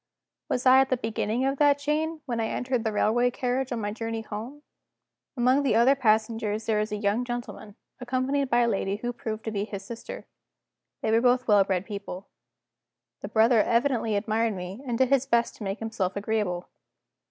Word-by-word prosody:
Was 250 - -1
I 260 +1 +7
at 270 - 0
the 255 - +1
beginning 225 +1 -1
of 275 0 -1
that 290 -1 +5
chain, 305 +2 -2
when 240 -4 -3
I 225 - 0
entered 250 -1 -2
the 220 - 0
railway 235 +4 +2
carriage 255 +2 -2
on 240 - -2
my 205 0 -2
journey 225 +1 -4
home? 225 +7 -8 0.7
Among 255 +3 +3
the 275 -6 +1
other 240 +4 +5
passengers 220 -3 0
there 215 -2 +1
was 215 +1 -2
a - - -1
young 210 +3 0
gentleman, 240 -4 -6 0.2
accompanied 255 +2 -1
by 240 0 +3
a 235 - +3
lady 195 -3 -1
who 240 +3 -4
proved 220 -2 -5
to 220 - -3
be 200 -1 -1
his 200 -2 -7
sister. 230 +2 -8 0.8
They 220 - +1
were 225 +1 +4
both 250 0 +2
well 205 -2 +6
bred 190 -1 -1
people. 200 -2 -7 0.9
The - - -5
brother 220 +2 +4
evidently 235 -2 +1
admired 220 +1 0
me, 185 +5 -7
and 235 -2 -1
did 260 0 +3
his 275 -1 +2
best 235 -2 +1
to - - -8
make 195 +1 -3
himself 220 -5 -3
agreeable. 200 -4 -2
230 Hz, 195 wpm, -26 LUFS, 210-255 Hz, 0.9 s, I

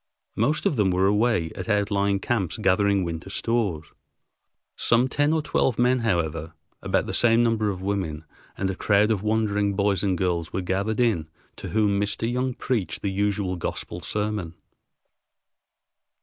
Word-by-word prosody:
Most 140 +8 +1
of 140 - +1
them 100 -3 +3
were 90 +1 +2
away 105 -4 +2
at 95 - -7
outlying 100 -1 +1
camps 95 -5 -1
gathering 100 -1 +2
winter 85 +2 -5
stores. 100 -8 -1 0.9
Some 120 +3 +2
ten 145 +3 +1
or 160 -1 +1
twelve 130 -5 +1
men, 125 +1 +3
however, 85 -7 -1 0.3
about - - 0
the - - -5
same 115 0 +4
number 110 -2 +1
of 95 -2 -5
women, 90 -6 -2 0.3
and 95 - -1
a - - -5
crowd 105 +3 +3
of 105 -4 0
wondering 105 -2 0
boys 100 -2 +1
and 95 -3 0
girls 85 -3 -1
were 95 - -2
gathered 100 +5 -1
in, 100 -11 +1 0.3
to - - -7
whom 105 -2 +2
Mr. 105 +2 -1
Young 125 +1 -1
preached 115 -9 -2
the 100 - 0
usual 100 -1 -1
gospel 85 +1 -5
sermon. 105 -2 -3
100 Hz, 160 wpm, -25 LUFS, 95-110 Hz, 0.9 s, same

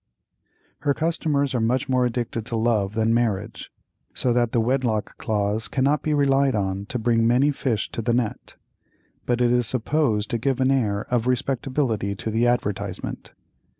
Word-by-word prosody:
Her 140 -2 0
customers 150 -4 0
are 125 - +1
much 120 +3 +1
more 130 -1 +2
addicted 120 -1 -3
to 115 - -3
love 110 -3 +1
than 110 0 +2
marriage, 110 -2 -1 0.4
so 125 - +1
that 120 -1 +1
the 120 - +2
wedlock 115 -2 0
clause 105 0 -1
cannot 140 +2 +1
be 155 - -1
relied 140 -2 +3
on 100 -1 -2
to 125 - -3
bring 115 -1 +2
many 130 +5 +3
fish 120 -6 -2
to - - -3
the 120 +2 0
net, 120 -3 -2 0.7
but 120 0 +1
it 120 -1 +3
is 125 -1 +2
supposed 115 -4 0
to 115 - 0
give 135 +2 0
an 130 +1 +3
air 105 -7 +1
of 120 0 +1
respectability 125 -4 -1
to 110 +4 -4
the 115 +2 +2
advertisement. 100 -5 -3
120 Hz, 170 wpm, -24 LUFS, 110-130 Hz, 0.7 s, relied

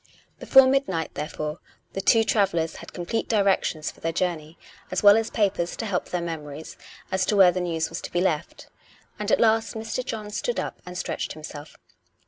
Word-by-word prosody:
Before 265 -1 +7
midnight, 260 - 0
therefore, 150 +1 -4 0.3
the 195 - -2
two 225 +3 +5
travellers 170 -7 +1
had - - -10
com 175 - -6
plete 225 +5 -1
directions 195 -7 +1
for - - -21
their 165 - -1
journey, 165 -2 -2 0.3
as - - -2
well 205 0 +9
as 225 0 0
papers 195 -5 0
to 225 - -4
help 190 -4 -1
their 180 -1 -2
memories, 155 -2 -6 0.4
as 190 0 +1
to 210 - +2
where 190 -3 +7
the 180 +1 -2
news 165 -2 -1
was - - -6
to - - -7
be 175 - 0
left. 170 -4 -1 0.5
And 210 0 -2
at - - +4
last 225 -1 +2
Mr. 220 +3 -3
John 215 -3 -5
stood 485 - -2
up - - -5
and 180 0 -6
stretched 165 -3 -3
himself. 150 -1 -10
185 Hz, 195 wpm, -25 LUFS, 165-215 Hz, 0.5 s, well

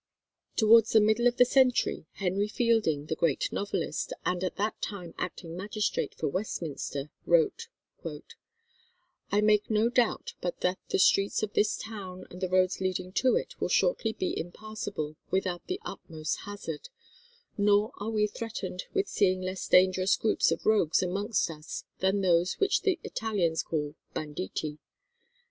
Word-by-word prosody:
Towards 225 0 +6
the 220 - +8
middle 220 +3 +4
of 245 0 +1
the 250 - +7
century, 250 - +2
Henry 195 +2 0
Fielding, 210 -10 +1
the 155 - -2
great 160 -5 +1
novelist, 205 - -2
and 180 0 0
at 185 - -2
that 210 +2 -2
time 180 -5 -5
acting 170 -2 -5
magistrate 205 +3 -2
for 155 - -2
Westminster, 150 -5 -3 0.2
wrote:[251:1] 465 0 -1 1.1
"I 205 +1 +3
make 210 -1 +3
no 220 +1 +3
doubt 245 -2 +1
but 175 - -3
that 180 +1 +1
the - - +1
streets 195 +2 +3
of 210 -1 -2
this 210 - +2
town 190 -4 -7
and 180 - -10
the 185 - -1
roads 185 0 +2
leading 185 -1 -2
to 255 +6 +3
it - - -2
will - - 0
shortly 225 - +2
be 190 -4 -2
impassable 180 -4 -5
without 185 -2 -1
the 370 +1 -2
utmost 155 -2 -4
hazard; 205 -7 -6 0.7
nor 205 +1 +3
are 210 +2 -3
we 215 -2 +2
threatened 210 -4 -5
with 395 0 +2
seeing 185 -2 +2
less 185 +1 -4
dangerous 185 +1 +5
groups 220 - +2
of - - -2
rogues 195 -7 +3
amongst 200 +1 0
us 155 -1 -7 0.2
than 190 +1 +2
those 175 -1 +3
which 400 0 +2
the 380 -5 +1
Italians 180 -8 0
call 150 -2 -3 0.2
banditti. 150 +1 -4
195 Hz, 155 wpm, -29 LUFS, 175-220 Hz, 1.1 s, the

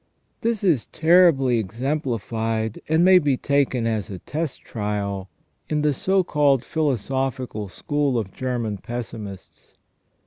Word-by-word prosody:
This 230 -2 -1
is 160 - +2
terribly 160 -7 +4
exemplified, 115 - -2
and 160 +2 +4
may 185 0 +8
be 145 -5 +1
taken 140 -4 +1
as 110 -3 -1
a 95 - -5
test 150 - -4
trial, 100 -3 -3 0.4
in 150 -1 0
the 150 -1 +3
so 190 +6 +2
called 145 -6 +2
philosophical 130 -6 -2
school 145 +4 -1
of 100 -5 -3
German 120 -5 -2
pessimists. 110 -4 -8
130 Hz, 125 wpm, -23 LUFS, 110-150 Hz, 0.4 s, may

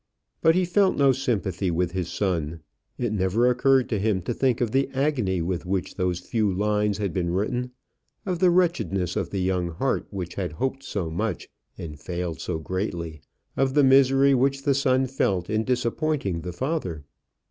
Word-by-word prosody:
But 160 0 +5
he 185 0 +3
felt 190 +2 +2
no 140 -1 +5
sympathy 100 -8 -1
with 85 0 0
his 90 -1 -3
son. 85 -5 -2 0.4
It 120 -3 -1
never 100 +4 +2
occurred 130 +1 +3
to 110 - 0
him 100 -3 0
to 120 - -2
think 130 -1 +1
of 120 -3 0
the 135 +2 +1
agony 125 - 0
with 90 0 -2
which 95 +1 -2
those 90 -2 -1
few 105 +1 0
lines 105 +1 +1
had 100 -5 -2
been 90 -2 -1
written; 115 +8 -1 0.6
of 180 -3 -2
the 185 0 +5
wretchedness 165 - +1
of - - -1
the 95 - -2
young 90 -1 0
heart 125 +11 -1
which 90 -4 -5
had 90 -6 -3
hoped 135 - -2
so 95 -11 -4
much 100 +2 -3 0.3
and 75 -3 -7
failed 85 +1 -4
so 90 - -2
greatly; 85 -2 -4 0.3
of 135 0 +1
the 145 - +5
misery 135 +1 +5
which 135 +1 +1
the 140 - +3
son 130 -1 +2
felt 100 -9 -1
in 110 0 +1
disappointing 125 - -1
the 90 - -5
father. 95 - -3
105 Hz, 180 wpm, -25 LUFS, 90-135 Hz, 0.6 s, But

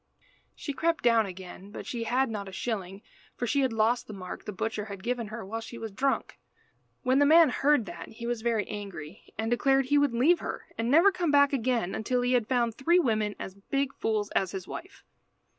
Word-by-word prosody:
She 285 - -5
crept 330 +3 0
down 230 -3 +4
again; 185 +1 -9
but 205 - -8
she 235 -2 -4
had 260 +3 +2
not 200 -2 -4
a - - -10
shilling, 195 -2 -4 0.3
for 245 - -2
she 280 +4 +1
had 260 -2 +2
lost 225 +2 +1
the 215 - -7
mark 185 -2 -8
the 210 - -4
butcher 210 +1 -3
had 200 -3 -8
given 240 -2 -2
her 220 0 -7
while 225 +4 -4
she 235 +1 -9
was 225 -2 -6
drunk. 270 +7 -1 0.6
When 260 +1 +3
the 285 - +5
man 325 0 +7
heard 280 -2 +2
that 170 -3 -8
he 230 +1 -9
was 240 -1 -2
very 225 -3 0
angry, 195 -5 -8
and 225 +1 -2
declared 270 +2 +3
he 290 +2 +3
would 285 -4 +2
leave 315 +9 +4
her, - - -5
and 230 +1 -1
never 335 +9 +6
come 360 -3 -1
back 285 -1 +5
again 240 -7 0
until 245 +3 0
he 245 +1 +2
had 240 -4 +2
found 240 -3 +2
three 330 +10 +3
women 215 - +1
as 190 - -6
big 275 +8 -2
fools 215 -2 -1
as 190 -1 0
his 190 -1 -5
wife. 370 - -9
235 Hz, 220 wpm, -28 LUFS, 210-270 Hz, 0.6 s, man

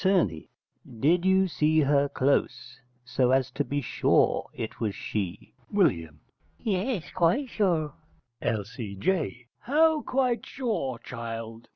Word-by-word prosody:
_ 140 - +2 0.5
Did 170 +8 +3
you 190 0 +4
see 155 -2 +2
her 140 0 +3
close, 130 -2 0 0.3
so 125 0 +1
as 130 0 +2
to 145 - -1
be 145 0 -2
sure - - +2
it 110 - -6
was 105 -4 -1
she? 105 +1 -4 0.2
W. 85 - +2 0.4
Yes, 205 -1 -2
quite 180 - +2
sure. 170 -10 +1 0.5
L.C.J. 115 - -2
How 310 +5 +3
quite 255 -3 0
sure, 220 - -2
child? 115 -1 -7
140 Hz, 115 wpm, -27 LUFS, 115-190 Hz, 0.5 s, you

